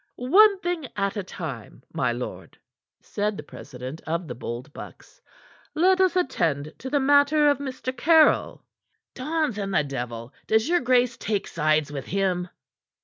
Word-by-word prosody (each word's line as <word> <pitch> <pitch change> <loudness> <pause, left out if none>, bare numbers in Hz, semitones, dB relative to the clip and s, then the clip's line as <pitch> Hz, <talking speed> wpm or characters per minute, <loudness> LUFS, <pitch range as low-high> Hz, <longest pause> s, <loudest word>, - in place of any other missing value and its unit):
"One 390 - +5
thing 345 -5 -3
at 200 0 -1
a 205 - -2
time, 185 - -8
my - - 0
lord," - - -7 0.4
said 210 0 -3
the - - -7
president 130 +1 -9
of 165 +1 -2
the 125 - -5
Bold 120 +4 -7
Bucks. - - -12 0.5
"Let 370 +4 +4
us 370 -1 +3
attend 160 - 0
to 260 - -6
the 290 +1 +1
matter 285 +2 +4
of 285 - -2
Mr. 260 -2 -5
Caryll." 320 +3 +3 0.5
"Dons 300 -4 -2
and 195 -1 -3
the 165 -6 +2
devil! 120 -3 -6
Does 220 +3 +2
your 350 +1 +3
grace 250 -1 +2
take 205 -2 -2
sides 155 -2 +1
with 140 -2 -6
him?" 185 -2 -1
220 Hz, 155 wpm, -25 LUFS, -, 0.5 s, One